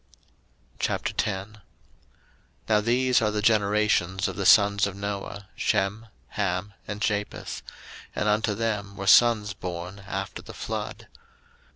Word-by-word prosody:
01:010:001 105 +1 -2 1.1
Now 105 - +3
these 125 +3 +3
are 105 - +2
the 105 0 -2
generations 105 -3 +2
of 95 - -5
the 100 -2 0
sons 100 -1 +6
of 95 - -6
Noah, 100 0 -5
Shem, 100 +2 0 0.2
Ham, 100 -1 -2
and 105 0 -5
Japheth: 105 -1 -2 0.5
and - - 0
unto 105 0 +1
them 105 -2 -2
were 100 - -4
sons 105 -1 +5
born 90 +1 -6
after 95 -1 -4
the - - -11
flood. - - -5
105 Hz, 125 wpm, -26 LUFS, 100-105 Hz, 1.1 s, sons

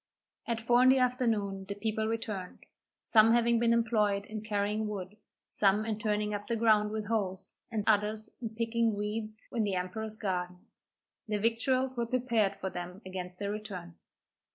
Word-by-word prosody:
At 235 -1 -1
four 240 +2 +4
in 255 - +7
the 265 - +6
afternoon 225 -7 +1
the 200 +1 -5
people 220 +1 -1
returned, 215 -5 -4 0.4
some 225 0 +6
having 235 0 +3
been 235 0 +3
employed 215 -4 +2
in 215 0 -6
carrying 210 0 -1
wood, 200 -1 -5 0.3
some 205 +1 +2
in 220 -1 -2
turning 210 -1 0
up 205 0 -4
the 235 - 0
ground 215 -2 +4
with 215 0 -3
hoes, 195 -4 -2 0.2
and 215 -2 -1
others 215 0 +1
in 230 - -3
picking 230 -1 +1
weeds 215 +1 -3
in 230 - 0
the 200 -2 0
emperor's 210 +4 -3
garden. 180 -3 -3 0.6
Their 210 -1 -1
victuals 255 +4 +1
were 235 -1 0
prepared 230 -5 +1
for 190 -1 -4
them 180 +3 -7
against 180 -1 -6
their 200 +1 -2
return. 195 -5 -6
215 Hz, 170 wpm, -31 LUFS, 200-230 Hz, 0.6 s, in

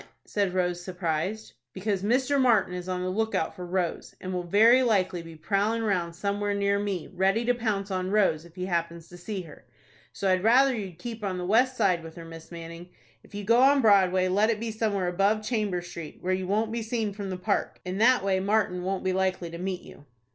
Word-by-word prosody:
said 200 -3 -1
Rose, 180 -1 0
surprised. 180 +3 -3 0.2
"Because 195 0 -2
Mr. 260 +6 +2
Martin 220 -8 +3
is 180 0 -5
on 180 0 -2
the 185 - -1
lookout 220 -5 -1
for 180 -1 -7
Rose, 180 -1 -2
and 185 0 -5
will 180 - -1
very 220 +8 +5
likely 190 -7 +1
be 165 -1 -11
prowling 205 +7 0
round 175 -5 -1
somewhere 205 +2 -1
near 200 0 +1
me, 195 -5 -3
ready 195 +5 +1
to 245 - +3
pounce 210 -4 -2
on 185 0 -1
Rose 190 -6 +2
if 170 0 -17
he 180 -1 -4
happens 170 -2 -2
to 175 - -12
see 190 +1 -5
her. 155 -3 -14 0.5
So 195 - -3
I'd 185 -1 +2
rather 260 +4 +5
you'd 195 -6 -6
keep 225 +3 -7
on 190 -2 -2
the 180 - -4
west 250 +6 +3
side 185 -6 +2
with 165 0 -10
her 170 - -9
Miss 165 0 -11
Manning. 170 +1 -9 0.3
If - - -15
you 205 - -4
go 230 +4 +4
on 275 +2 +6
Broadway, 190 -4 +4
let 205 +4 +2
it 220 -2 0
be 230 0 -3
somewhere 210 -4 -1
above 200 +4 +1
Chamber 210 -6 -1
Street, 170 -3 -8
where 185 +1 0
you 185 0 -2
won't 215 +3 0
be 230 0 -2
seen 220 -2 -2
from 200 -1 -6
the 185 - -3
Park. 180 - -1
In 185 +2 -3
that 245 -1 +5
way 190 -1 +1
Martin 195 -2 +1
won't 190 +1 -2
be 185 0 0
likely 185 -2 -1
to 170 - -7
meet 185 0 -3
you." 145 - -14
190 Hz, 225 wpm, -27 LUFS, 180-215 Hz, 0.5 s, on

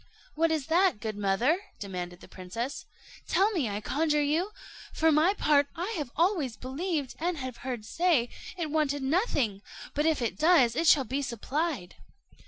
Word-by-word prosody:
"What 330 +1 +2
is 315 -4 0
that, 340 - +3
good 215 -1 -4
mother?" 205 - +2 0.2
demanded 180 -3 -6
the - - -12
princess; 225 +9 -6 0.4
"tell 400 +3 +3
me, 310 - 0
I 205 +1 -3
conjure 300 +5 +1
you. 320 +7 +1 0.4
For 320 0 +3
my 320 +6 +4
part, 290 -6 +3
I 350 -1 -2
always 320 - +1
believed, 285 +1 -3
and 345 +1 -1
have 260 -3 -5
heard 245 -4 -5
say, 320 -4 +2 0.3
it 320 -4 -3
wanted 290 -3 0
nothing; 265 - 0 0.3
but 295 +2 +1
if 320 -2 +2
it 235 -2 -2
does, 305 -8 +5
it 330 - +1
shall 305 -5 +6
be 265 +4 -2
supplied." 255 - -3
290 Hz, 165 wpm, -29 LUFS, 235-330 Hz, 0.4 s, shall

